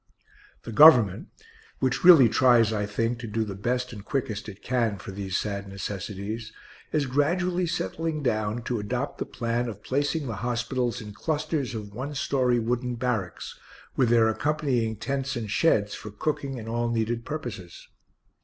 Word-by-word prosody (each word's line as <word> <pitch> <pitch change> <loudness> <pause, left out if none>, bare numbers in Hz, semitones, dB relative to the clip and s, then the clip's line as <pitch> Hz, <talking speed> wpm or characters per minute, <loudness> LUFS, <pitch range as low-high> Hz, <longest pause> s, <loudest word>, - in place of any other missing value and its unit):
The 115 - -7
Government 120 - +7 0.5
(which 130 -1 0
really 170 -9 +9
tries, 115 -1 +4
I 105 -1 -1
think, 115 +3 -1
to 115 - -6
do 110 +1 -1
the 105 -2 -5
best 125 +5 -2
and 105 -3 -9
quickest 110 -5 -3
it 100 -1 -12
can 115 -5 0
for 95 - -8
these 95 -1 -3
sad 100 -1 -3
necessities) 100 +3 -5 0.4
is 150 -2 +1
gradually 175 +7 +1
settling 155 - -2
down 110 -1 -1
to 120 -1 -2
adopt 125 +7 -3
the - - -3
plan 120 +1 -2
of 105 -2 -9
placing 145 +3 -1
the 115 -5 -4
hospitals 120 0 -1
in 105 -1 -9
clusters 155 -1 -2
of 105 -2 -7
one 135 +6 -5
story 130 -3 +1
wooden 120 +2 -1
barracks, 115 -7 -3 0.4
with 125 -3 +3
their 115 -1 +5
accompanying 125 -3 0
tents 135 +5 -3
and 110 -4 -4
sheds 105 -8 +2
for 105 - -7
cooking 135 +4 -3
and 110 -2 -7
all 120 +1 -1
needed 115 0 -1
purposes. 120 - -7
120 Hz, 165 wpm, -26 LUFS, 105-135 Hz, 0.5 s, really